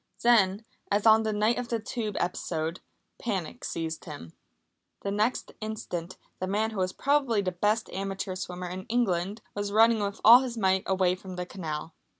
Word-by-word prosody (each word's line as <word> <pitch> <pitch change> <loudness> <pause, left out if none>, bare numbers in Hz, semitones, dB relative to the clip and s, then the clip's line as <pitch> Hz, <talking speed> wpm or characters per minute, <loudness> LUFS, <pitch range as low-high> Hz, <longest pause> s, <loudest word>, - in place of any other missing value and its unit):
Then, 215 -3 +4 0.2
as 205 +1 +1
on 220 0 +7
the 220 -1 -1
night 215 +3 +2
of 245 - -4
the 235 - +1
Tube 215 -2 -4
episode, 165 -1 -2 0.4
panic 190 -8 -3
seized 165 -1 -4
him. 145 - -9 0.7
The 200 - -2
next 215 +5 0
instant 185 -5 -5 0.2
the 185 - -2
man 215 +3 0
who 215 - -5
was 185 0 +1
probably 270 -4 +1
the 185 - 0
best 210 +5 +1
amateur 195 0 -3
swimmer 180 -1 -5
in 185 +1 -6
England, 210 -3 0
was 205 0 -3
running 225 +1 +5
with 200 0 -2
all 235 +3 +11
his 250 -3 -4
might 190 -2 +2
away 185 -1 +2
from 185 0 -8
the 180 0 -3
canal. 160 -4 -5
200 Hz, 175 wpm, -28 LUFS, 180-220 Hz, 0.7 s, all